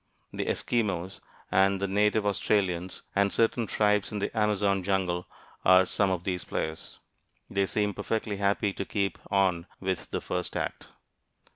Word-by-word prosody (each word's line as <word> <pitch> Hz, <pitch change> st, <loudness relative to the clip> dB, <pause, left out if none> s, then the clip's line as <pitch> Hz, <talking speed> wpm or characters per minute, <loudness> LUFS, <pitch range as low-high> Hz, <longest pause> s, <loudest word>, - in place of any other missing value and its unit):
The -, -, -2 dB
Eskimos, 95 Hz, -6 st, -1 dB, 0.3 s
and 95 Hz, +1 st, +4 dB
the 100 Hz, -, 0 dB
native 105 Hz, +2 st, +2 dB
Australians, 95 Hz, -3 st, 0 dB
and 100 Hz, 0 st, +3 dB
certain 115 Hz, 0 st, +1 dB
tribes 105 Hz, -1 st, +2 dB
in 105 Hz, -, -3 dB
the 100 Hz, -, -3 dB
Amazon 105 Hz, -2 st, +2 dB
jungle 90 Hz, -2 st, 0 dB, 0.4 s
are 95 Hz, 0 st, +7 dB
some 100 Hz, +1 st, +1 dB
of 90 Hz, -2 st, -1 dB
these 90 Hz, -2 st, -2 dB
players. 80 Hz, 0 st, -4 dB, 0.5 s
They 100 Hz, 0 st, +1 dB
seem 105 Hz, +2 st, 0 dB
perfectly 105 Hz, +1 st, -2 dB
happy 100 Hz, 0 st, +1 dB
to -, -, -3 dB
keep 100 Hz, 0 st, -2 dB
on 95 Hz, -3 st, +2 dB
with 95 Hz, -2 st, -3 dB
the -, -, -2 dB
first 90 Hz, 0 st, -3 dB
act. -, -, -4 dB
100 Hz, 150 wpm, -28 LUFS, 95-105 Hz, 0.5 s, are